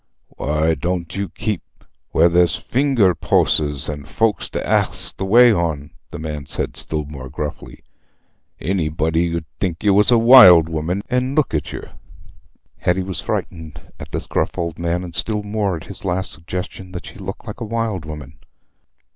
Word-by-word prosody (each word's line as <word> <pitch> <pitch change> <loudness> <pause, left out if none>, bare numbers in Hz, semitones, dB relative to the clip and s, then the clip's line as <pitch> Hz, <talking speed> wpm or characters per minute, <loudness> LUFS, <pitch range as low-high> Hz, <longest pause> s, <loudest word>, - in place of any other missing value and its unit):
"Why 75 +2 0
dooant 85 +2 -3
you 100 -2 -3
keep 105 +1 -3 0.5
where 85 - +4
there's 85 -2 +3
a - - -16
finger 125 -8 +2
poasses 75 -2 +1
an' 75 -2 -5
folks 110 +8 0
to - - -4
ax - - +1
the 95 - -4
way 120 +4 +6
on?" 80 -6 -2 0.2
the - - -7
man 75 -3 -6
said, - - -3
still 75 -1 -3
more 70 -3 -9
gruffly. 75 +2 -6 0.8
"Anybody 80 -1 0
'ud 80 - -6
think 85 -3 -2
you 100 -2 +4
was 105 +2 +4
a 120 - +6
wild 115 -9 +9
woman, 85 +5 -2
an' 125 +2 0
look 155 - +1
at 75 - -2
yer." - - -8 0.9
Hetty 90 +1 +1
was 95 -2 -4
frightened 80 -3 -4 0.2
at - - -9
this - - -3
gruff - - -1
old 85 -1 -3
man, 85 +1 -1
and 85 -2 -8
still 105 +1 -1
more 105 -2 -1
at 80 - -11
this 100 - -8
last 95 -1 -1
suggestion 90 +3 -6
that 90 - -7
she - - -11
looked - - -7
like - - -8
a - - -1
wild 115 -5 -2
woman. 75 -4 -9
85 Hz, 175 wpm, -20 LUFS, 80-100 Hz, 0.9 s, wild